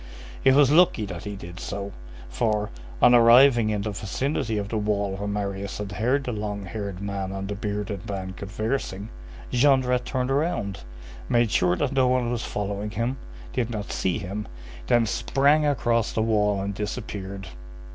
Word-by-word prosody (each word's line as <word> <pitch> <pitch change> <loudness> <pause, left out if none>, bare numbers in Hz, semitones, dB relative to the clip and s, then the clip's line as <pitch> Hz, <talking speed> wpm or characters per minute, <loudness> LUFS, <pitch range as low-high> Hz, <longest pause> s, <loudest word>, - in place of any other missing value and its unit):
It 135 - +6
was 140 -1 +6
lucky 155 -9 +4
that 90 -4 -7
he 105 0 -4
did 85 -2 -9
so, 100 +2 -5 0.4
for, 105 - -1 0.3
on 125 - +8
arriving 120 0 +7
in 105 -2 -1
the 105 - -2
vicinity 110 +3 -2
of 100 -1 -3
the 110 - -1
wall 100 -2 0
where 100 +1 -4
Marius 100 -1 -3
had 105 -1 -5
heard 125 +8 +1
the 125 - -3
long 105 -2 -4
haired 100 -2 -5
man 100 -1 -3
and 95 0 -4
the 100 - -3
bearded 105 -2 -4
man 95 -2 -4
conversing, 105 +1 -3 0.4
Jondrette 125 -1 +3
turned 130 -1 -1
round, 135 - -1 0.5
made 120 -2 +3
sure 90 -5 +3
that 140 +4 -1
no 130 -2 +3
one 125 -1 +1
was 120 -1 -2
following 100 0 -3
him, 115 +4 -2 0.4
did 120 -3 0
not 105 -3 -4
see 95 -2 0
him, 100 +1 -5 0.4
then 120 -1 +4
sprang 140 +8 +2
across 120 -5 +1
the 110 - 0
wall 105 -2 +2
and 100 0 -3
disappeared. 100 -2 -5
105 Hz, 170 wpm, -25 LUFS, 100-125 Hz, 0.5 s, on